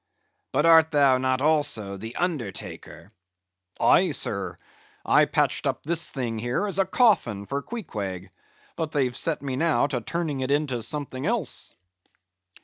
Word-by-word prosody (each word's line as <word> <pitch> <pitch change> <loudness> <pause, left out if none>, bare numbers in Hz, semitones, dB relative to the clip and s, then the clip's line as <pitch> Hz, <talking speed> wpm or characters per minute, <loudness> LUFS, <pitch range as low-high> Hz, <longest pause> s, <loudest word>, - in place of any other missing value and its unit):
But 150 +4 +2
art 160 -1 +7
thou 140 -4 +4
not 130 +1 0
also 145 -10 +1
the 110 +4 -8
undertaker?" 110 - -4 0.7
"Aye, 185 0 +5
sir; 100 -8 -4 0.5
I - - +5
patched - - 0
up - - -2
this 170 +1 0
thing 120 -5 -3
here 120 - -1
as 195 -2 -2
a 195 - +4
coffin 120 - +2
for 140 +6 -3
Queequeg; 100 - -6 0.4
but 160 -2 -3
they've 130 -5 +1
set 160 +1 -2
me 135 -2 -3
now 165 -1 +2
to 135 -4 -2
turning 160 +1 -3
it 130 0 -2
into 140 -4 0
something 140 +3 -4
else." 215 - -2
140 Hz, 145 wpm, -25 LUFS, 115-160 Hz, 0.7 s, art